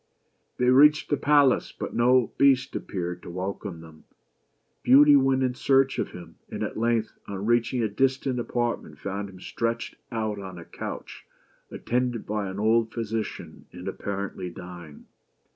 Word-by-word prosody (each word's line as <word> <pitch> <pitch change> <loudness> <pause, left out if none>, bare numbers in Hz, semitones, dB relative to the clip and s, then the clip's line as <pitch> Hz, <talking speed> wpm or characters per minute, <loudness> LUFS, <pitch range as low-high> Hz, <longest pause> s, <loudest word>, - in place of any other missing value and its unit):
They 125 0 +3
reached 150 +4 +5
the - - +4
palace, 145 -3 +3
but - - -6
no 125 0 +3
Beast 135 -2 +4
appeared 90 -2 -4
to - - -10
welcome 95 -1 -5
them. 80 -1 -15 0.8
Beauty 145 +3 +7
went 135 -1 +3
in 130 -1 +1
search 135 +1 +2
of - - -1
him, 85 -2 -12
and - - -4
at - - -4
length, 115 -1 0
on 100 0 -5
reach 120 0 +2
ing 125 -2 0
a - - +2
distant 130 +3 0
apartment, 120 0 -2
found 100 +1 -4
him 95 -1 -13
stretched 115 +4 -3 0.2
out 110 -3 -2
on 95 -2 -8
a 85 - -10
couch, - - -8 0.4
attended 125 -1 -2
by 105 -2 -2
an 95 - -6
old 110 +1 +2
physician, 115 -1 -5
and, - - -9
apparently 100 -2 -4
dying. 85 -3 -11
115 Hz, 160 wpm, -26 LUFS, 95-130 Hz, 0.8 s, Beauty